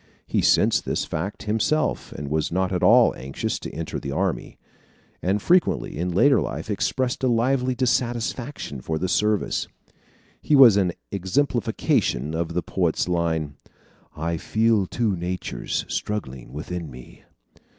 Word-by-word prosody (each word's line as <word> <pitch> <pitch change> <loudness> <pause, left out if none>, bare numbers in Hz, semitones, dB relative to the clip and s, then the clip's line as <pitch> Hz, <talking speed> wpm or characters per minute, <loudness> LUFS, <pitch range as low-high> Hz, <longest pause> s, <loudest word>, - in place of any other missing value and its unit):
He - - 0
sensed - - +3
this - - -1
fact 95 +7 -4
himself 115 +9 0
and 70 - -6
was 75 +2 -1
not 95 +1 0
at 90 - -1
all - - +6
anxious 65 +2 -4
to - - -7
enter 80 +1 -4
the 70 - -5
army; - - -2 0.6
and 95 +3 +1
frequently 180 - +2
in 85 +4 -2
later 135 +11 +4
life - - -4
expressed 125 +6 -1
a - - +3
lively 125 +2 +1
dissatisfaction 120 - -2
for 80 +4 -2
the 95 - -1
service. 105 +2 0 0.7
He 150 - +2
was 130 -7 +9
an 95 -4 +2 0.2
exemplification 95 - 0
of 85 0 -2
the 90 - 0
poet's 90 -3 0
line: 80 -4 -1 0.6
"I 85 +2 -2
feel 110 +2 +1
two 110 -3 0
natures 90 +1 -3
struggling 65 -13 -4
within 80 +3 -5
me." 65 -1 -13
95 Hz, 140 wpm, -24 LUFS, 80-115 Hz, 0.7 s, was